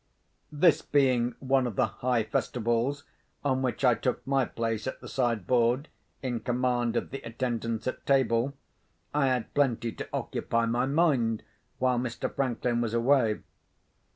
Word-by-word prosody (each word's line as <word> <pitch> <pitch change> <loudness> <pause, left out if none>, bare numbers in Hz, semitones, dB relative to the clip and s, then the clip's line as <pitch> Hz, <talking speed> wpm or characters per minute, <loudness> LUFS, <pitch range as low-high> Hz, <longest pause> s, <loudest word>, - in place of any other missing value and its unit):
This 155 +2 +4
being 130 -4 +2
one 135 -1 +1
of 115 - -5
the - - +3
high 125 -2 0
festivals 120 +5 -1 0.4
on 130 -2 +2
which 130 +1 -1
I 125 - +6
took 120 +3 -2
my 135 -1 +2
place 115 0 -3
at - - -4
the - - -10
side 120 -7 0
board, 125 - +2 0.3
in 125 -3 -1
command 120 0 0
of - - -3
the 135 - -5
attendance 115 -1 -3
at 130 - -3
table, 135 -1 +2 0.6
I 145 -2 +3
had 125 -3 -1
plenty 125 -5 +1
to - - -7
occupy 115 0 -1
my 120 +3 +1
mind 135 -8 +2 0.3
while 125 -1 +2
Mr. 120 -1 -3
Franklin 120 -2 0
was 115 -1 -1
away. 115 -2 +3
125 Hz, 155 wpm, -28 LUFS, 115-135 Hz, 0.6 s, I